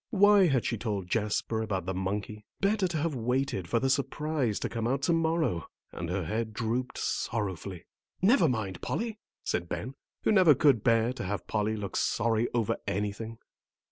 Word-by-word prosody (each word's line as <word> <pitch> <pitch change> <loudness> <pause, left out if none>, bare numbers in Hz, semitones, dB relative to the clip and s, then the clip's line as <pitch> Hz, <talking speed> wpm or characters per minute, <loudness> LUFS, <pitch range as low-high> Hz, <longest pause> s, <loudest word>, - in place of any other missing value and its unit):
Why 205 -3 +6
had 130 -6 +1
she 115 - -1
told 100 -5 -3
Jasper 110 0 0
about 100 -5 -2
the 95 - -2
monkey? 100 +3 -3 0.2
Better 200 -1 +2
to 170 -2 -2
have 155 +1 0
waited 125 -5 -1
for 115 - +1
the 135 - +1
surprise 140 -3 0
to - - 0
come 115 -1 -2
out 135 +2 0
to 170 - +3
morrow. 160 - +1 0.2
And 85 -1 -5
her 95 -1 -1
head 110 +5 -2
drooped 120 +3 -2
sorrowfully. 95 -5 -3 0.3
"Never 190 - +5
mind, 100 -7 -2
Polly," 225 -1 -3 0.2
said 85 0 -2
Ben, 130 +4 -4 0.3
who - - +3
never 185 -8 +7
could 130 -6 +4
bear 115 0 +3
to - - -5
have 95 -1 -3
Polly 110 0 0
look 100 -2 -5
sorry 115 0 +1
over 115 -3 0
anything. 105 +3 -3
115 Hz, 175 wpm, -29 LUFS, 105-145 Hz, 0.3 s, never